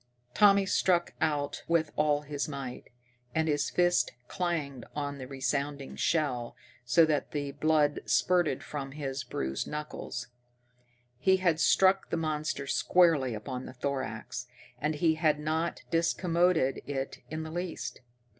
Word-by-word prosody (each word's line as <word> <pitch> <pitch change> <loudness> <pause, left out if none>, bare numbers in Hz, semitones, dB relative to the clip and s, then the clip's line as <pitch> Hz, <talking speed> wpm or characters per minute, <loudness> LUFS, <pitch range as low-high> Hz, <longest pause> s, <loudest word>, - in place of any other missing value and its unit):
Tommy 200 -1 +6
struck 180 -2 +2
out 145 -2 0
with 165 -2 +2
all 150 -1 +2
his 145 -1 -3
might, 135 -4 -6 0.5
and 160 0 +2
his 145 -2 +1
fist 175 0 +2
clanged 150 -8 -2
on 145 -1 -3
the 130 - -6
resounding 140 +1 -2
shell 130 -8 0 0.3
so 125 +7 +5
that 155 -2 -1
the 145 -2 -2
blood 150 0 +2
spurted 180 -3 +2
from 135 -2 -5
his 135 -2 -4
bruised 65 - -3
knuckles. 150 -4 -5 0.9
He 190 +7 +4
had 175 -4 +2
struck 190 +3 +4
the - - -1
monster 155 -3 -2
squarely 150 -5 +3
upon 125 +4 -5
the - - -9
thorax, 125 -2 -4 0.3
and 150 +2 0
he 160 +2 +3
had 155 -3 +4
not 160 +3 -1
discommoded 170 -3 +2
it 135 -1 -3
in 155 +1 -4
the 160 - -7
least. 175 +1 -4
150 Hz, 135 wpm, -30 LUFS, 135-165 Hz, 0.9 s, Tommy